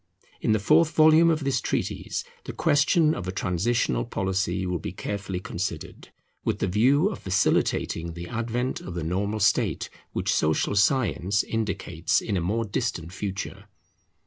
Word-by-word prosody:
In - - +1
the 110 - +4
fourth 155 +10 +3
volume 160 +2 +6
of 155 -2 +1
this 135 -3 0
treatise - - -2 0.2
the - - -6
question 150 +2 +3
of 95 - -5
a - - -1
transitional 90 - 0
policy 95 +2 -1
will 90 -1 -2
be 80 - -5
carefully 95 0 -4
considered, 85 -2 -5 0.3
with - - 0
the - - 0
view 130 - +3
of 210 - -6
facilitating 85 -3 0
the 85 +1 -7
advent 120 +3 -2
of 90 - -7
the 85 - -3
normal 100 +6 -1
state 100 - +1 0.2
which - - 0
social 80 +6 +1
science 100 -3 +2
indicates 95 -7 -1
in 105 - -3
a 90 - 0
more 110 +7 -1
distant 85 -4 -3
future. 100 0 -5
100 Hz, 155 wpm, -26 LUFS, 90-120 Hz, 0.3 s, volume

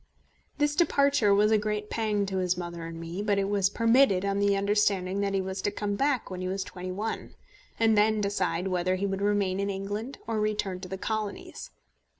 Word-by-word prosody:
This 295 0 +1
departure 280 - +3
was 210 +2 +4
a 215 - +4
great 210 0 -3
pang 210 -3 0
to 190 -1 -3
his 180 -1 0
mother 170 -1 -5
and 165 0 -8
me; 165 +4 -5
but 205 -1 +1
it 195 0 +1
was 200 -1 +2
permitted 230 -3 +3
on 200 0 0
the 200 0 +3
understanding 200 -1 +1
that 200 -1 0
he 195 - +1
was 190 0 -4
to - - 0
come 205 0 -3
back 265 0 0
when 185 0 -5
he 185 - -2
was 190 +1 -2
twenty 185 -1 -7
one, 215 +4 -4 0.4
and 225 -1 +4
then 215 +1 +3
decide 190 -2 -1
whether 185 0 +1
he 190 +2 -2
would 195 0 -2
remain 200 -2 +1
in 200 0 -1
England 205 +6 -4
or 225 -1 -1
return 210 -3 -1
to 185 - -8
the 190 +1 -5
Colonies. 215 0 -4
200 Hz, 210 wpm, -28 LUFS, 190-215 Hz, 0.4 s, was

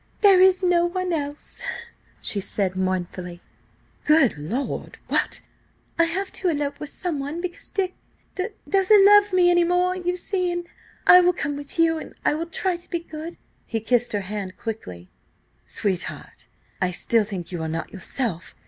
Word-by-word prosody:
"There 390 -3 +7
is 375 0 +5
no 350 -1 +3
one 365 0 -2
else," 290 -2 -4 0.6
she 205 - -1
said 195 -1 -1
mournfully. 185 -1 -3 0.6
"Good 305 -5 +4
lord! 195 - -4
What—" - - +1 0.6
"I 335 - +6
have 380 +4 -2
to 375 - -2
elope 290 -3 -2
with 300 - -6
someone–because–Dick–d 355 +5 -4 0.2
doesn't 390 +1 +5
love 410 0 +7
me 360 -1 +5
any 350 0 +4
more–you 360 +1 +1
see. 360 -1 -1 0.4
I 360 - +9
will 360 0 +4
come 290 -3 -2
with 285 +5 -8
you, 325 -1 +3
and - - -10
I - - +4
will 325 +3 -3
try 355 +2 -1
to 350 - -14
be 345 - -1
good." 330 0 -8 0.3
He 225 - -2
kissed 240 +2 +1
her 205 - 0
hand 195 -1 -5
quickly 90 - -7 0.6
"Sweetheart!... 190 -4 -4 0.3
I 180 - +2
still 220 +5 +2
think 190 -4 -6
you 175 -2 -4
are 160 - -3
not 165 +1 -4
yourself. 190 -1 -3
315 Hz, 155 wpm, -24 LUFS, -, 0.6 s, I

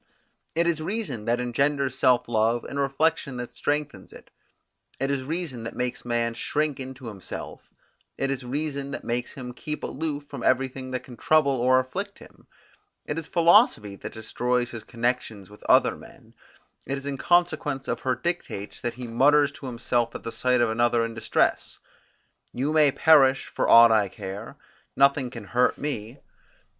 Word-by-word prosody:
It 170 +1 +2
is 170 -2 0
reason 175 - -3
that 120 +1 +1
engenders 135 +2 0
self 125 -2 +3
love, 115 +1 +1
and 140 - -5
reflection 140 -1 0
that 125 -1 -6
strengthens 150 0 -3
it; - - -15 0.7
it 135 +1 0
is 140 -1 -1
reason 155 -4 -4
that 115 - -6
makes 125 0 -3
man 120 -1 -1
shrink 150 +4 -1
into 130 0 -8
himself; 105 -5 -8 0.5
it 135 0 -1
is 135 -1 -3
reason 140 +2 -3
that 140 - -6
makes 120 +1 -3
him 125 -2 -7
keep 150 +4 -6
aloof 145 -1 -4
from 140 -3 -8
everything 130 +1 0
that 130 -1 -4
can 125 -2 -12
trouble 155 -3 +3
or 130 0 +3
afflict 195 +11 -4
him: - - -17 0.6
it 150 - -3
is 160 - -8
philosophy 170 - +4
that - - -8
destroys 120 +2 -1
his 115 -2 -7
connections 115 -4 -3
with 105 - -15
other - - +5
men; - - -16 0.5
it 135 - -2
is 135 - -8
in 140 -2 -4
consequence 155 -6 +1
of - - -2
her 130 -1 0
dictates 165 - -4
that 120 - -3
he 125 0 -7
mutters 145 +5 +4
to 140 - -9
himself 120 -1 -1
at - - -7
the 115 - -5
sight 125 0 +1
of 120 -2 +2
another 120 0 +2
in 115 - -5
distress, 110 - 0 0.7
You 140 +5 -1
may 150 -3 +5
perish 135 -3 +5
for - - -2
aught 115 0 +9
I 105 -2 +3
care, 105 +11 -8 0.4
nothing 140 -1 +3
can 115 -3 -8
hurt 120 +5 +1
me. 130 -3 -5
130 Hz, 170 wpm, -25 LUFS, 120-145 Hz, 0.7 s, aught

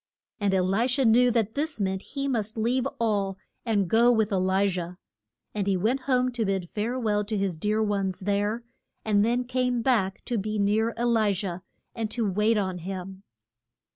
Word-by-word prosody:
And 205 -2 +1
E 190 - +2
li 195 +6 +1
sha 265 +2 +1
knew 245 +2 +5
that 225 -2 0
this 300 -2 -2
meant 190 -1 -1
he 275 +4 -4
must 220 -4 -2
leave 245 +4 +1
all 200 -4 0 0.3
and 210 -5 +1
go 235 +6 +5
with 220 -2 +1
E - - +1
li 190 +2 +2
jah. 180 -2 -4 0.6
And 205 -2 -2
he 195 -2 +2
went 225 +9 +1
home 255 -1 +2
to 240 -2 -2
bid 195 -3 -1
fare 220 +7 -2
well 210 -4 0
to 210 +1 -3
his 195 -3 -1
dear 210 +6 0
ones 195 -3 -1
there, 205 +4 -1 0.4
and 205 -2 +3
then 240 +3 +1
came 250 -1 -1
back 215 -7 +1
to 240 -3 -1
be 215 +2 -3
near 215 +3 +1
E - - 0
li 225 -4 +3
jah 185 -2 -4 0.3
and 225 -2 -3
to 225 -1 -1
wait 210 +3 +2
on 185 -3 -1
him. 190 +1 -6
215 Hz, 200 wpm, -26 LUFS, 195-235 Hz, 0.6 s, knew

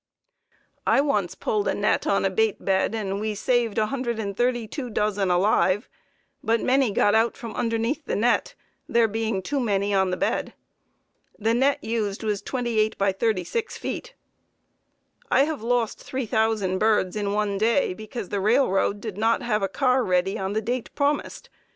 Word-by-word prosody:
I - - +4
once 205 -11 0
pulled 210 +1 -1
a - - +1
net 205 - +1
on 195 - +2
a 190 - +1
bait 220 +1 0
bed 195 +3 +1
and 200 -2 -2
we 215 0 -2
saved 235 0 0
132 240 +1 -1
dozen 210 -3 0
alive, 185 +3 +2 0.6
but 230 +1 +2
many 265 0 +2
got 205 0 +2
out 225 +1 +2
from 230 -5 -7
underneath 230 +6 -1
the - - -2
net, 235 +4 +1 0.3
there 230 -1 +4
being 220 -2 -2
too 285 +7 -1
many 205 -4 0
on 190 -1 +2
the 185 - -2
bed. - - -1 0.8
The 220 +2 +1
net 270 +4 +2
used 220 -2 -2
was 210 -2 -1
28 225 -2 -1
× 195 -1 0
36 225 - -1
feet. - - -6 1.1
I 270 - +5
have 305 -4 -3
lost 235 -1 0
3,000 220 -6 -1
birds 215 -4 +2
in 205 -1 -1
one 205 -1 0
day 230 0 +2
because 215 0 -7
the 205 - -1
railroad 205 -3 +2
did 210 -3 -6
not 225 +2 +2
have 215 -3 0
a 195 - +1
car 255 +3 +2
ready 185 0 +1
on 190 +1 -3
the 220 +1 -1
date 245 +2 -2
promised. 285 0 -1
220 Hz, 165 wpm, -24 LUFS, 200-240 Hz, 1.1 s, I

